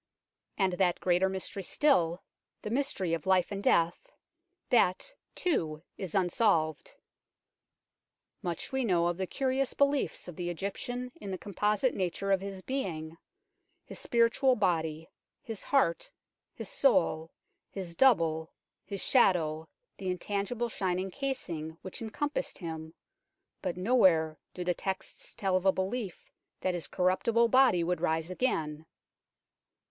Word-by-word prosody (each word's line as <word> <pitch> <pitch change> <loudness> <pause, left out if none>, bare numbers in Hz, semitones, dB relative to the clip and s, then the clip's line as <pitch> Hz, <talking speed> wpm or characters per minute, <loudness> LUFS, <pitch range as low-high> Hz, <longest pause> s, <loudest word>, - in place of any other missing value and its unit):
And 190 -3 +2
that 180 -1 +2
greater 180 +1 +2
mystery 190 +1 -3
still, 180 - +2 0.4
the 210 - -4
mystery 230 -10 0
of 165 +1 -3
life 185 -1 +3
and 200 -1 -3
death, 170 - +2 0.6
that, 230 - +3 0.2
too, 160 - -1
is 190 -3 -5
unsolved. 175 -4 +1 1.5
Much 175 -2 -3
we 265 0 0
know 175 -6 +2
of 175 0 0
the 190 -1 -2
curious 265 +2 0
beliefs 280 -6 +1
of 180 - -8
the 175 +1 -3
Egyptian 245 +8 -4
in 200 - -6
the 190 - -3
composite 210 +5 0
nature 195 +1 -2
of 190 -1 +3
his 195 -1 -6
being, 165 - -3 0.7
his - - -9
spiritual 235 +2 +3
body, 160 -5 0 0.3
his 225 -3 -6
heart, 265 -12 +1 0.4
his - - -6
soul, 165 - +2 0.4
his 180 -4 -6
double, 165 -11 +3 0.3
his 200 -2 -5
shadow, 160 - +3 0.3
the 190 - -4
intangible 200 +6 -2
shining 185 -2 -1
casing 170 - -3
which 185 - -7
encompassed 285 +7 -2
him, 160 -2 -6 0.7
but 180 -2 -3
nowhere 180 - +3 0.2
do 180 - -3
the 180 0 +1
texts 190 +2 -4
tell 190 -2 0
of 185 +1 +1
a - - +7
belief 190 +1 -3 0.3
that 185 - 0
his 170 -5 -2
corruptible 225 +6 +2
body 255 -9 +5
would 175 -1 -1
rise 160 0 0
again. 160 -8 -1
185 Hz, 130 wpm, -30 LUFS, 170-230 Hz, 1.5 s, a